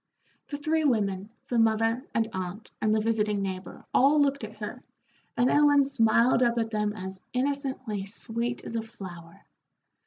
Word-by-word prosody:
The 285 - -4
three 315 +2 0
women, 205 -7 +1 0.2
the 240 - +1
mother, 225 +2 +2
and 225 -1 +2
aunt, 185 +3 -5
and 215 - +2
the 215 - +3
visiting 210 -2 +1
neighbor, 190 -1 -6
all 285 +3 +5
looked 280 -2 +2
at 220 0 -7
her, 215 +4 -6 0.6
and 245 +1 +4
Ellen 290 0 +5
smiled 235 -2 +3
up 240 -1 +3
at 225 -1 0
them 210 -1 0
as 190 -2 -7
innocently 260 -6 -2
sweet 235 +3 -3
as 230 - -5
a 225 - 0
flower. 185 -7 -11
225 Hz, 160 wpm, -28 LUFS, 210-255 Hz, 0.6 s, all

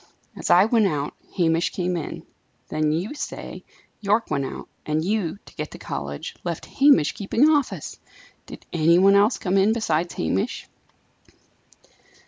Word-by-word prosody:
As - - -5
I 185 +3 +7
went 225 -2 +3
out, 145 -4 -2 0.2
Hamish 165 -1 +2
came 180 -1 -2
in. 165 -4 -5 0.4
Then, 155 0 0
you 175 - -2
say, 295 - -7 0.4
Yorke 210 +2 0
went 140 -1 0
out; - - -7 0.2
and 155 +1 -1
you, 200 -4 -1
to - - -15
get 150 -1 -5
to - - -10
college, 70 +1 -6
left 170 -2 -4
Hamish 275 - +4
keeping 225 +8 +2
office! 295 -4 0 0.5
Did - - -11
any 165 +1 +4
one 195 +2 +6
else 205 +4 +4
come 190 0 0
in 200 +3 +4
besides 175 -7 -1
Hamish?" 90 +4 -2
180 Hz, 150 wpm, -23 LUFS, 155-210 Hz, 0.5 s, I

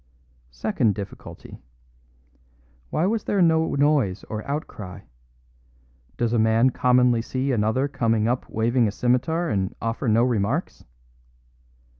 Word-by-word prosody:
Second 100 - 0
difficulty: 100 -2 -9 1.3
Why 160 - 0
was 215 +2 -1
there 200 - 0
no 160 -3 +3
noise 140 -10 +1
or 110 0 -3
outcry? 105 - -6 1.2
Does 120 -1 0
a 120 - +2
man 110 +3 +3
commonly 125 -1 +3
see 130 +3 -2
another 115 +4 +1
come 115 -5 0
up 125 +2 -2
waving 115 +2 +1
a - - -1
scimitar 130 +10 0
and 95 -2 -1
offer 115 +3 -3
no 115 +1 +4
remarks? 125 - -1
120 Hz, 120 wpm, -24 LUFS, 110-140 Hz, 1.3 s, no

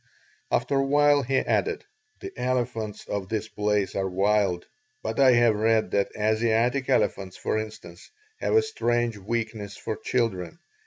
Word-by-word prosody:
After 140 - +1
a - - +2
while 145 +1 +4
he 135 +1 0
added: - - 0 0.4
"The 390 - -6
elephants 120 -4 -2
of 100 -2 -4
this 110 -1 -2
place 105 -2 0
are 95 -1 -1
wild, 95 -1 +1 0.4
but 110 +3 -3
I 130 -2 +7
have 120 -2 +4
read 110 -2 +1
that 100 -1 +1
Asiatic 115 +5 +1
elephants, 95 -7 0
for 110 - -1
instance, 100 -5 -9 0.3
have - - 0
a 445 - +5
strange 120 - -1
weakness 110 -1 -4
for 110 - -4
children. 110 - -2
110 Hz, 150 wpm, -26 LUFS, 105-125 Hz, 0.4 s, I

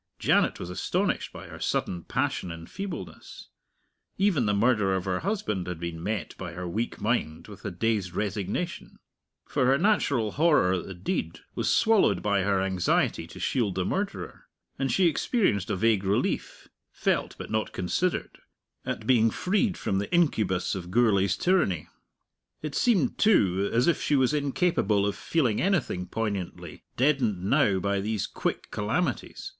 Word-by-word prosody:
Janet - - +2
was 90 - -6
astonished 90 - -1
by - - -10
her - - -10
sudden 85 -2 -1
passion 90 - -1
in 85 -1 -7
feebleness. 180 - -8 0.7
Even 185 - +2
the 105 - +2
murder 105 -3 +2
of 95 0 -2
her 90 -1 0
husband 110 - -2
had 90 -2 -4
been 85 -1 -5
met 105 +1 -3
by 90 -3 -6
her 90 +1 -5
weak 110 +7 -3
mind 105 -9 -1
with 105 -2 -12
a - - -1
dazed 100 -1 -1
resignation. 105 - -3 0.5
For 135 -3 +1
her 135 +1 +4
natural 140 - +2
horror 150 - +3
at 90 - -2
the 95 - -7
deed 85 -2 -3
was - - 0
swallowed 205 - +3
by 100 -1 +2
her 100 0 +1
anxiety 95 -2 +1
to - - -11
shield 110 -8 0
the 95 -1 0
murderer; 200 +1 -4 0.3
and 135 -1 0
she 190 - +3
experienced 165 - +1
a - - 0
vague 105 0 +2
relief 100 +1 -1 0.2
felt - - -1
but - - -8
not 110 0 -1
considered 165 - -2 0.4
at - - -4
being 115 -3 +4
freed 195 - 0
from 95 - -1
the 100 - -4
incubus 110 - +1
of 90 -2 -5
Gourlay's 100 -3 +3
tyranny. 155 - +1 0.7
It 150 -2 -4
seemed, 185 - +2
too, 100 - +3
as 120 +2 +3
if 170 - +2
she 150 - +1
was 130 0 +3
incapable 140 - +1
of 100 - -1
feeling 130 -10 0
anything 155 - 0
poignantly, 100 -3 -4
deadened 125 -9 +2
now 95 0 +3
by 100 +1 0
these 105 0 -1
quick - - -3
calamities. 120 +7 -2
105 Hz, 160 wpm, -27 LUFS, 95-145 Hz, 0.7 s, her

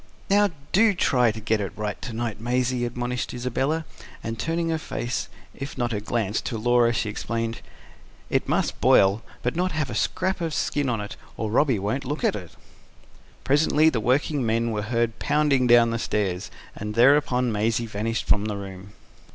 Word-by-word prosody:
"Now 205 0 +5 0.2
do 215 +1 +4
try 125 -8 +3
to 110 - -7
get 110 0 0
it 100 - -4
right 105 -1 -4
to 125 - -5
night, 115 -2 -4
Maisie," 125 +1 0
admonished 120 +1 -3
Isabella; 135 +6 -1 0.4
and, 115 0 -4
turning 165 +2 -1
her 160 -1 0
face, 125 -4 -3 0.2
if 135 0 -7
not 120 -1 -1
her 105 - -1
glance, 105 0 -1
to 115 - -4
Laura, 120 +1 +3
she 115 -1 -1
explained: 115 +2 -3 0.7
"It - - 0
must - - 0
boil, 100 +3 +5 0.2
but 125 - -1
not 180 +1 0
have 155 -5 -1
a - - -4
scrap 185 - -1
of 165 -3 -2
skin 145 -2 0
on 115 -3 -1
it, 105 - -7 0.2
or 110 -2 -2
Robby 130 0 +3
won't 105 +8 -2
look 145 +4 -3
at - - +2
it." 90 -6 -8 0.9
Presently 150 +2 +4
the 120 - -1
working 135 +4 +1
men 115 +1 +1
were 105 -1 -1
heard 115 +1 -1
pounding 145 -4 +2
down 120 -1 +6
the 115 - -1
stairs, 95 -5 -1 0.3
and 105 +1 -5
thereupon 125 -1 +4
Maisie 110 +2 0
vanished 115 +1 -2
from 100 +1 +3
the 105 -1 -3
room. 95 0 -9
120 Hz, 185 wpm, -25 LUFS, 110-135 Hz, 0.9 s, down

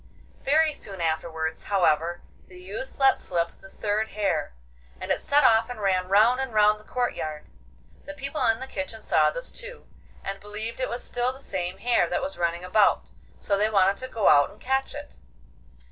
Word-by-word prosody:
Very 310 +2 +3
soon 195 -8 -7
afterwards, 160 -1 -2
however, 175 -3 +1 0.2
the 180 -1 -14
youth 200 +8 -7
let 270 -1 +4
slip 170 -1 -2
the 195 - -14
third 210 +2 -1
hare, 180 - -1 0.4
and - - -4
it - - +1
set 290 +1 +3
off 225 -1 +5
and 245 -3 -6
ran 185 -2 +1
round 220 +6 +4
and 265 -2 -2
round 210 0 +5
the - - -17
courtyard. 160 -11 -3 0.6
The 295 - -8
people 275 +2 -3
in 225 0 +2
the 260 - -5
kitchen 220 -1 -5
saw - - +3
this - - -6
too, - - -9 0.4
and 195 0 -4
believed 210 +4 -6
that 255 - +1
it - - -7
was 240 - -4
still 245 +1 -1
the 265 - -13
same 180 -7 -4
hare 235 -6 +2
that - - -1
was 190 -2 -4
running 170 0 -1
about, 200 +3 +2 0.3
so 200 - 0
they 210 +2 +2
wanted 195 -1 +3
to 260 - -5
go 225 -5 0
out 145 -1 +6
and 210 - -17
catch 265 +2 -1
it. 290 0 -9
210 Hz, 195 wpm, -26 LUFS, 180-250 Hz, 0.6 s, out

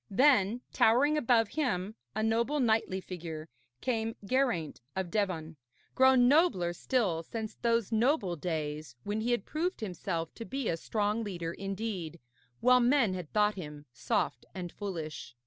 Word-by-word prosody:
Then, 240 -1 +4
towering 270 +7 +4
above 235 -6 +3
him, 215 -10 -1 0.2
a 215 - 0
noble 235 +6 +1
knightly 220 -6 +1
figure, 165 -4 -7 0.3
came 225 -3 -1
Geraint 235 - 0
of 190 -2 -3
Devon, 165 -7 -1 0.4
grown 260 -1 +6
nobler 265 - +3
still 195 -6 0
since 220 +5 -5
those 230 -2 0
noble 225 - +2
days 150 -4 -4
when 210 +2 -2
he 235 - -1
had 240 -4 +1
proved 345 +5 -2
himself 175 -5 -3
to 230 - -7
be 265 +1 -3
a 165 - +1
strong 210 +5 -1
leader 170 -5 -4
indeed, 195 -4 -4 0.4
while 250 +1 +6
men 245 -4 +3
had 180 -4 -6
thought 210 0 +3
him 150 -6 -8
soft 120 - -1
and 180 -2 -5
foolish. 160 - -6
210 Hz, 145 wpm, -31 LUFS, 175-240 Hz, 0.4 s, grown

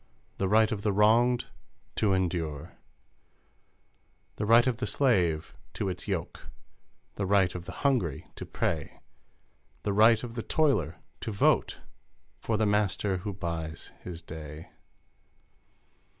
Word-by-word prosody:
The 95 - +1
right 110 +3 +4
of 105 -3 -2
the 105 - +1
wronged 115 +4 +4 0.5
to 105 - +2
endure! 85 -5 -2 1.6
The 105 - -2
right 115 +2 +6
of 125 -3 0
the 125 - -2
slave 90 - +1 0.2
to 95 - -1
its 90 - -5
yoke, - - -4 0.7
The 100 - -1
right 95 -2 +3
of 90 -1 -7
the - - -5
hungry 115 - +1
to - - -5
pray, 80 -3 -3 0.8
The 100 - 0
right, 110 +2 +5
of 120 -2 -6
the 115 - -3
toiler 110 - +1 0.2
to 110 - -4
vote 100 - +2 0.6
For 110 - -1
the 110 - +2
master 100 -1 +1
who 100 +3 -4
buys 85 -4 -5
his 85 -2 -8
day 75 -1 -9
100 Hz, 135 wpm, -29 LUFS, 85-110 Hz, 1.6 s, right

